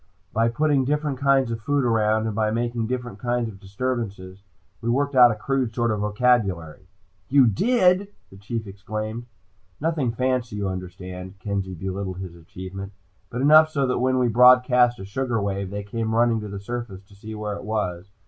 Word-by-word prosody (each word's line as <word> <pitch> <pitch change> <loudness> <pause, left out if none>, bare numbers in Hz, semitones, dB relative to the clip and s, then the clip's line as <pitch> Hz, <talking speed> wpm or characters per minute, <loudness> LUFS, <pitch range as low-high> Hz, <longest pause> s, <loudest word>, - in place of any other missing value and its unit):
"By 115 +1 +2
putting 145 +2 +2
different 145 0 -1
kinds 135 -3 +3
of 115 -1 -4
food 145 +4 +1
around, 110 -1 +2
and 110 - -2
by 110 -1 +1
making 115 0 -1
different 125 -4 -4
kinds 120 -1 -1
of 100 -3 -10
disturbances, 100 -3 -4 0.4
we 115 - -2
worked 140 +4 +1
out 125 -2 +8
a 110 - -1
crude 125 +1 -1
sort 120 -2 +1
of 105 - -1
vocabulary." 105 -8 0 0.4
"You 140 -1 +6
did 185 - +3
" - - -42
the 95 - -13
Chief 110 +3 -5
exclaimed. 110 +4 -5 0.5
"Nothing 150 -6 0
fancy, 125 -2 -1
you 100 -1 -2
understand," 90 0 -7
Kenzie 100 -2 -3
belittled 95 +1 -4
his 90 -2 -7
achievement. 95 +4 -9 0.4
"But 125 0 -4
enough 155 +2 +7
so 135 -4 0
when 130 +1 +2
we 125 -1 +3
broadcast 125 +1 +5
a 95 - -8
sugar 120 +3 -2
wave, 100 -1 -2
they 100 +1 -5
came 110 +2 -3
running 115 -1 +3
to 105 - -6
the 100 0 -6
surface 105 -2 -6
to 100 - -21
see 110 +2 -9
where 105 -1 -4
it - - -8
was. 100 -4 -3
115 Hz, 185 wpm, -24 LUFS, 100-125 Hz, 0.5 s, out